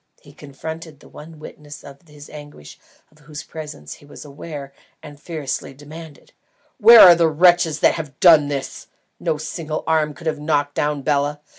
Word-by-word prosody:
he 145 - -19
confronted 155 +2 -10
the - - -18
one 160 +1 -13
witness 150 -1 -12
of 140 -1 -14
his 150 -1 -14
anguish 145 - -13 0.3
of 155 - -26
whose 150 -1 -10
presence 145 - -10
he - - -18
was 145 - -13
aware, 145 -1 -10 0.3
and 145 -1 -13
fiercely 150 -4 -6
demanded: 150 +1 -13 0.5
"Where 230 +1 +9
are 180 - +10
the 170 -1 +2
wretches 170 0 +2
who - - +6
have 150 -5 -7
done 160 -5 +6
this? 140 -2 -6 0.3
No 155 - -2
single 155 0 -6
arm 155 -2 0
could 170 - -14
have 155 -2 -2
knocked 145 -1 -1
down 145 -1 -2
Bela. 145 0 -1
150 Hz, 170 wpm, -20 LUFS, 145-160 Hz, 0.5 s, are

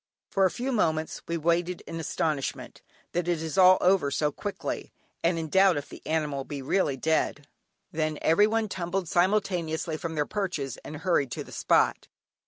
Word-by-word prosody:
For 195 - +3
a - - +4
few 255 +8 -3
moments 160 -9 0
we 170 - -1
waited 170 +2 0
in 165 - -7
astonishment 155 -3 -2 0.3
that 175 0 -1
it 175 -2 +1
is 160 -2 -4
all 185 0 +7
over 180 -6 +3
so 150 +2 0
quickly, 205 +7 -5 0.3
and 170 0 +2
in 160 -1 -3
doubt 190 +1 +4
if 145 - -5
the - - -11
animal 150 -4 -1
be 145 +1 -6
really 140 0 0
dead. 155 0 0 0.5
Then 155 -1 -1
everyone 215 +6 +3
tumbled 180 -1 -3
simultaneously 175 -4 0
from 160 0 -5
their 150 -1 +1
perches 170 - -3
and 155 - -8
hurried 160 -4 +1
to - - -4
the - - -14
spot. - - +2
165 Hz, 175 wpm, -27 LUFS, 155-185 Hz, 0.5 s, all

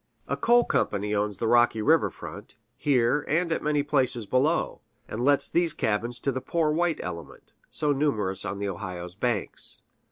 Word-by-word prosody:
A - - 0
coal 240 +1 +4
company 105 - 0
owns 105 -1 0
the 115 - -1
rocky 120 -1 +4
river 105 - +3
front, - - -10 0.2
here 140 0 +2
and 170 +2 +1
at - - 0
many 150 -1 +1
places 130 -5 +1
below, 130 +10 +1 0.3
and 115 +3 -4
lets 140 +1 +4
these 170 -2 +1
cabins 115 +3 -1
to 140 - 0
the 130 0 -3
poor 155 +3 0
white 170 +1 +1
element, 85 -4 -8 0.2
so 150 -2 0
numerous 110 -10 0
on 100 +2 -4
the 100 0 -3
Ohio's 90 -2 -6
banks. 110 +1 -3
120 Hz, 170 wpm, -26 LUFS, 105-150 Hz, 0.3 s, coal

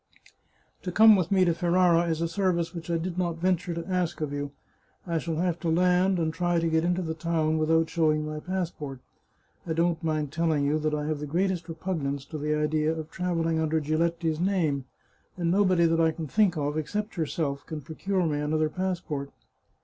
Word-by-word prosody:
" - - -40
To 180 - -4
come 220 +3 +8
with 180 -2 0
me 190 -2 +4
to 170 - +3
Ferrara 175 0 +3
is 160 0 -1
a 170 - +1
service 170 -1 0
which 170 -1 -7
I 170 - +1
did 175 +2 -3
not 170 -2 -1
venture 180 0 0
to 170 - -4
ask 180 -3 -1
of 150 -2 -3
you. 145 0 -3 0.6
I 170 -2 -1
shall 165 +1 -3
have 175 +1 0
to 170 - -2
land 180 +3 +3
and 160 -2 0
try 175 0 +1
to 165 - 0
get 160 0 +2
into 180 +1 0
the 160 -1 -2
town 160 -1 0
without 160 +1 +3
showing 155 -2 +1
my 155 0 -4
passport. 165 -6 -4 0.7
I 160 - 0
don't 165 0 0
mind 155 -3 -1
telling 160 -3 +1
you 150 +2 +1
that 155 0 0
I 150 0 -2
have 155 -1 -2
the 150 - -5
greatest 175 +2 -1
repugnance 155 -5 -3
to 155 - -5
the 150 +1 0
idea 150 +1 +1
of 160 -1 -5
travelling 165 -2 0
under 160 0 +1
Giletti's 160 +1 0
name, 165 -8 0 0.5
and 170 -2 0
nobody 185 -3 +4
that 165 0 +2
I 160 - +4
can 160 0 -4
think 195 +1 +2
of, 145 +1 -1
except 210 +7 -3
yourself, 145 -4 -2
can 155 -2 -5
procure 180 +5 -2
me 150 -2 0
another 155 +1 0
pass 185 +2 -2
port." 145 -5 -5
165 Hz, 210 wpm, -27 LUFS, 155-180 Hz, 0.7 s, come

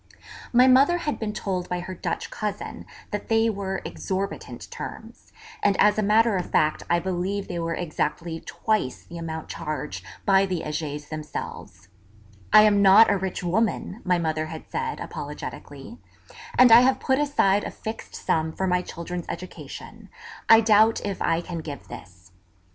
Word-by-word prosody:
My 250 +1 +6
mother 270 +7 +5
had 300 -4 -3
been 220 -2 -2
told 185 -4 -3
by 180 0 -2
her 185 +2 -6
Dutch 180 - -4
cousin 210 -1 -5 0.2
that 205 - -4
they 225 0 +3
were 195 -2 -4
exorbitant 195 +1 -5
terms; - - -9 0.3
and, 200 -1 +2
as 210 +1 +4
a - - +3
matter 215 0 +3
of 180 - -4
fact, 155 0 +2
I 175 - +4
believe 190 +3 -2
they 175 -2 -4
were 165 0 -2
exactly 165 0 -3
twice 215 - -2
the 170 - -9
amount 160 -1 -6
charged 150 -1 -5 0.2
by 195 0 +4
the 180 -3 -2
Hegers 150 -1 -4
themselves: 155 -1 -7 0.6
'I 215 - +9
am 205 -1 +4
not 200 +3 +7
a 200 - +2
rich 190 -1 -4
woman,' 210 +3 -1
my 180 -1 +2
mother 155 -2 -1
had 160 0 -8
said, 460 0 -3
apologetically, - - -8 0.6
'and 250 -2 +7
I 230 +1 +10
have 260 +1 +3
put 265 +1 +1
aside 205 -9 +2
a - - -4
fixed 220 +1 -7
sum 160 0 -1
for 190 - -2
my 180 -1 +2
children's 175 0 -6
education; 185 - -8 0.4
I 225 0 +9
doubt 220 0 +4
if 200 -2 -4
I 165 0 +1
can 175 -1 -6
give 150 -3 -8
this.' 90 +1 -12
190 Hz, 165 wpm, -25 LUFS, 165-215 Hz, 0.6 s, I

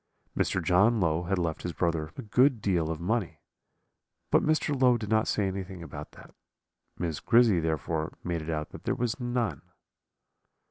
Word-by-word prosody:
Mr. 95 - 0
John 100 +8 +4
Low 85 -1 +1
had 95 +2 0
left 85 -3 -2
his 90 - -4
brother 80 -3 -1
a 135 - -5
good 125 +3 +3
deal 90 -6 0
of 80 -1 -3
money, 100 +2 -1 0.9
but - - +5
Mr. 155 -1 +1
Low 125 -2 +4
did 105 -3 -6
not 110 0 +3
say 105 - +1
anything 95 -2 -5
about 80 - -9
that; - - -15 0.6
Miss 85 -3 -2
Grizzy 115 -6 +4
therefore 80 0 -2
made 85 -2 -2
it 80 - -7
out 75 -1 -2
that - - -11
there 125 - 0
was 125 0 -2
none. 120 - -1
95 Hz, 175 wpm, -28 LUFS, 80-115 Hz, 0.9 s, but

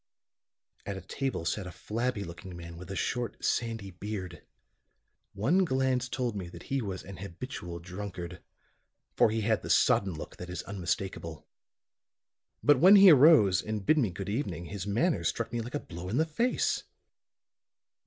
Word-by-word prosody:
At 100 -1 -4
a - - -7
table 130 +1 -3
sat 95 +2 -2
a - - -7
flabby 115 +2 -2
looking 85 +1 -9
man 85 0 -9
with 90 +2 -10
a 95 - -4
short 120 +5 -2
sandy 115 -4 -1
beard. 95 -1 -6 0.9
One 160 - +2
glance 130 -4 +1
told 125 -4 -2
me 90 -3 -5
that 85 -1 -11
he 135 - +1
was 95 -4 -5
an 95 -1 -9
habitual 95 -2 -7
drunkard, 90 -1 -7 0.7
for - - +5
he 110 +1 -1
had 110 +1 +1
the - - -7
sodden 95 -4 +3
look - - -8
that 90 - -8
is 90 - -5
unmistakable. 90 -3 -4 1.2
But 145 -3 +5
when 185 +7 +8
he 195 -2 +10
arose 135 - +7
and 105 -2 -4
bid 155 +7 +4
me 115 -7 +2
good 95 +2 -6
evening 100 - -3
his 100 +2 -6
manner 155 - +1
struck 115 0 -2
me 120 - -1
like 120 +5 -6
a - - 0
blow 90 -4 -8
in 115 - -1
the 160 - +3
face. 230 +11 0
100 Hz, 170 wpm, -30 LUFS, 90-125 Hz, 1.2 s, he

